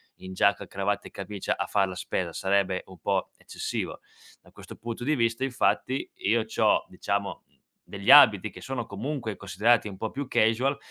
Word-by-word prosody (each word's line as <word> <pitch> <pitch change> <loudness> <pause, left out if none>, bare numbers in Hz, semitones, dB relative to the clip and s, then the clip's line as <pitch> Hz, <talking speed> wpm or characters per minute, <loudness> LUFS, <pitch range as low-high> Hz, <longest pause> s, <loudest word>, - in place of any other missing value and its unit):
in 95 0 -10
giacca 100 +2 +2
a - - -12
cravatta 100 +1 -2
e - - -33
camicia 100 0 -4
a - - -2
far 100 -2 +2
la 90 - -6
spesa, 90 -1 -3
sarebbe 95 -1 +1
un 95 - -13
po' 95 +1 -1
eccessivo. - - -5 0.4
Da - - -20
questo - - -12
punto 115 +2 -6
di 150 +3 +1
vista, 115 +1 0
infatti, 130 0 0
io 110 +2 +1
c'ho, 110 -1 +2
diciamo, 100 +2 -3 0.4
degli 100 -1 0
abiti 110 -8 +8
che - - -12
sono 130 -3 -4
comunque 110 +2 -4
considerati 105 +4 +2
un 95 - -8
po' 110 +3 -4
più 140 -1 -5
casual, 125 +5 +2
105 Hz, 180 wpm, -27 LUFS, 100-120 Hz, 0.4 s, abiti